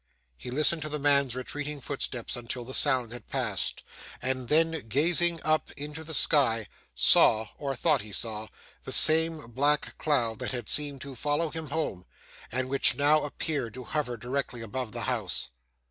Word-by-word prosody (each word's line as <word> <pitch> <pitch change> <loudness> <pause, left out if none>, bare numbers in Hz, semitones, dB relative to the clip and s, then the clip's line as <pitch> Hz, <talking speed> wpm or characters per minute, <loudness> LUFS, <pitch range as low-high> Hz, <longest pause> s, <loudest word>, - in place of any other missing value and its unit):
He 125 - -9
listened 155 +5 +4
to 155 - -4
the 150 - -3
man's 140 -3 +1
retreating 145 +3 -5
footsteps 130 -3 -3
until 120 0 -6
the 130 - -7
sound 130 -6 +2
had 120 - -12
passed, 120 -8 -3 0.4
and 130 -1 -3
then, 160 -4 +1
gazing 170 +6 +2
up 155 0 0
into 150 +2 -7
the 160 0 -3
sky, 120 -8 +3 0.3
saw, 110 - +5
or 140 -2 -3
thought 150 +1 +1
he 105 0 -11
saw, 110 +1 -2 0.4
the - - -8
same 160 -4 +6
black 145 +5 -1
cloud 120 -8 -1
that - - -4
had 120 -3 -5
seemed 145 -2 0
to 140 -1 -8
follow 150 +5 -1
him 160 -1 -7
home, 145 - -4 0.4
and 130 +2 -2
which 135 +1 +4
now 150 +2 +2
appeared 145 -5 -4
to 130 - -8
hover 125 -1 -4
directly 125 +1 -4
above 125 +1 -5
the - - -6
house. - - -3
140 Hz, 170 wpm, -27 LUFS, 120-150 Hz, 0.4 s, same